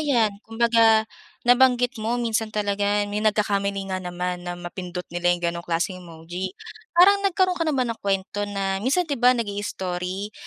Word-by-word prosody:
ayan 240 -9 +2
kumbaga 225 -1 +3 0.4
nabanggit 245 -1 +4
mo 225 +3 -1
minsan 225 -2 -1
talaga 205 -1 0
may 205 +1 -3
nagkakamali 200 -2 0
nga 185 - -2
naman 180 0 -4
na 175 - -4
mapindot 180 0 -6
nila 175 0 0
'yung 175 0 +1
gano'ng 170 - -5
klaseng 175 +2 -1
emoji. 175 +2 -7 0.4
Parang 400 +3 +7
nagkaroon 370 -1 +1
ka 330 - 0
na 310 - +1
ba 255 - +2
ng 230 -1 -4
kuwento 200 +1 -1
na 195 -1 -2
minsan 275 - +1
'di 285 -6 -4
ba, 250 0 +5
nag-i-story 200 -2 -4
205 Hz, 165 wpm, -24 LUFS, 185-240 Hz, 0.4 s, Parang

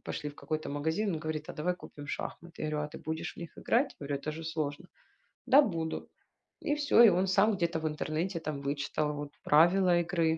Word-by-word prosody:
пошли 150 -2 -4
в 145 - -17
какой-то 155 +1 -4
магазин, 160 +9 -1
он 155 - -4
говорит: 155 -1 -4
"А - - -4
давай 175 +4 -1
купим 145 -4 -10
шахматы". 170 +3 -6
Я 155 - -1
говорю: 150 0 -1
"А - - -5
ты - - -9
будешь 160 0 -4
в - - -9
них 170 - -8
играть?" 270 +4 +1
Я 145 - -6
говорю: 140 0 -1
"Это 155 - -3
же 160 +1 -7
сложно". 160 +1 -3 0.6
"Да, 280 +3 +8
буду". 165 - -2 0.6
И 295 -2 +2
всё, 290 -5 +5
и 230 - +10
он 185 +1 +2
сам 200 +3 +4
где-то 170 -4 0
в 160 - -1
интернете 155 +4 -2
там 155 -3 -4
вычитал 145 +1 -1
вот 145 0 -6
правила 175 +5 +5
игры. 165 -2 +1
160 Hz, 220 wpm, -31 LUFS, 150-180 Hz, 0.6 s, и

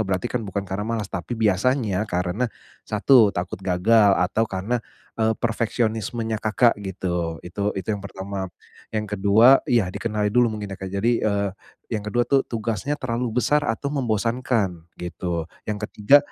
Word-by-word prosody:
berarti 95 -2 -1
kan 120 0 -1
bukan 100 -2 -4
karena 100 +3 -4
malas. 110 -4 -3
Tapi 95 +6 -4
biasanya 110 0 +1
karena, 90 +7 -1 0.3
satu, 110 +1 +5
takut 90 -1 -4
gagal 100 +3 +4
atau 105 +5 +1
karena, 105 +6 -1 0.4
eee, 110 0 +2
perfeksionismenya 115 -1 -1
Kakak 110 0 +3
gitu, 90 -4 -3
itu 100 +4 -2
itu 95 0 -5
yang 105 - -3
pertama. 95 -1 -5 0.4
Yang 105 -2 -3
kedua 110 +7 +7
iya, 105 -7 +2
dikenali 105 -1 -1
dulu 125 0 +4
mungkin 105 -2 -6
ya, 95 - -8
Kak, 95 - -4
jadi, 100 +5 +1 0.2
eee, 100 -1 0 0.4
yang 110 - 0
kedua 120 +3 +1
tuh, 140 - +3
tugasnya 115 +4 -2
terlalu 120 -3 -2
besar 150 +4 +3
atau 140 +6 -2
membosankan 115 - 0 0.2
gitu. 85 -1 -3 0.2
Yang 105 +1 -3
ketiga, 120 +8 +6
105 Hz, 155 wpm, -23 LUFS, 95-115 Hz, 0.4 s, kedua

